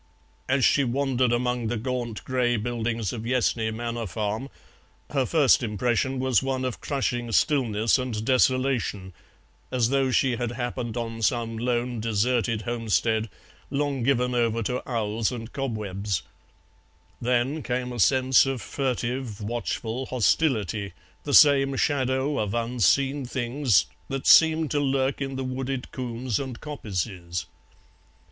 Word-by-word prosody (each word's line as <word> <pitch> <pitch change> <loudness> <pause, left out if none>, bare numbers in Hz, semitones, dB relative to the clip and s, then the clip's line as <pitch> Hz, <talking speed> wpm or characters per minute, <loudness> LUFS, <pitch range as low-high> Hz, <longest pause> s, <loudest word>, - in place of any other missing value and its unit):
As 130 -1 +3
she 140 - +4
wandered 130 -1 +1
among 125 -1 0
the 120 +1 -1
gaunt 120 -1 -3
grey 125 -2 +1
buildings 115 -1 -2
of 115 - -5
Yessney 115 -2 +1
manor 115 0 -4
farm 110 +7 -3 0.6
her 135 -4 +1
first 150 -6 +4
impression 120 +4 0
was 130 -3 +2
one 135 -1 -2
of 125 - -4
crushing 120 -4 -2
stillness 115 -4 +2
and 115 -4 -3
desolation, 130 -7 +1 0.6
as 120 -3 +2
though 135 -1 +2
she 125 -1 +2
had 120 -1 -2
happened 120 -1 -4
on 115 -1 -4
some 115 0 0
lone 120 +1 -1
deserted 115 +1 0
homestead 115 -1 0 0.4
long 140 -2 -1
given 125 0 +1
over 115 -1 +1
to 125 +4 -2
owls 110 -1 -1
and 115 -2 -7
cobwebs; 105 - -3 1.0
then 125 +5 0
came 125 -1 -3
a 120 - -6
sense 130 +4 +4
of 135 -2 -2
furtive 125 -3 -3
watchful 115 +3 -3
hostility, 110 - +1 0.3
the 145 - -2
same 140 -2 +6
shadow 135 0 0
of 105 0 -1
unseen 125 +4 +1
things 120 - +1 0.2
that 135 -1 -4
seemed 160 -2 +6
to 145 - +1
lurk 135 0 0
in 135 -1 -3
the 130 - -3
wooded 130 0 -4
combes 125 -2 -3
and 130 -4 -5
coppices. 95 - -4
125 Hz, 135 wpm, -25 LUFS, 115-130 Hz, 1.0 s, same